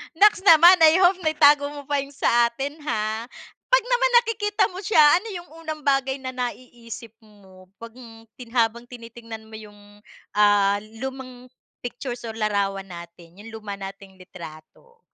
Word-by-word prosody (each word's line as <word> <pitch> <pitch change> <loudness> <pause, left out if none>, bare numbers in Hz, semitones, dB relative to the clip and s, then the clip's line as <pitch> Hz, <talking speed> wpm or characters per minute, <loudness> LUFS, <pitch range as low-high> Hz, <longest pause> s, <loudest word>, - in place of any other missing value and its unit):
Naks 400 +2 +4
naman! 345 +1 +8
I 325 +2 +5
hope 360 +1 +4
naitago 295 -2 +4
mo 285 -1 -11
pa 290 - +1
yung 280 0 -5
sa 240 -3 +2
atin, 275 +5 -5
ha. 220 -3 -3 0.4
Pag - - +3
naman - - +2
nakikita 415 -3 -1
mo 365 - -11
siya, 395 -4 +3 0.2
ano 405 +5 -7
yung 350 -1 -9 0.2
unang 310 -1 -5
bagay 270 -1 0
na 260 - -5
naiisip 240 -2 -7 0.2
mo 190 -3 -19 0.2
pag, 230 - -8
hmm, 225 -2 -15
tin 245 -2 -12
habang 235 -1 0
tinitingnan 230 -2 -11
mo 220 - -10
yung, 205 -1 -16 0.4
ah, 205 -1 +4 0.2
lumang 255 -1 -8 0.3
pictures 245 0 -7
or 220 - -8
larawan 200 -2 -1
natin, 170 +1 -13
yung 225 - -12
luma 210 -2 -7
nating 195 0 -10
litrato? 180 - -14
240 Hz, 160 wpm, -23 LUFS, 210-300 Hz, 0.4 s, naman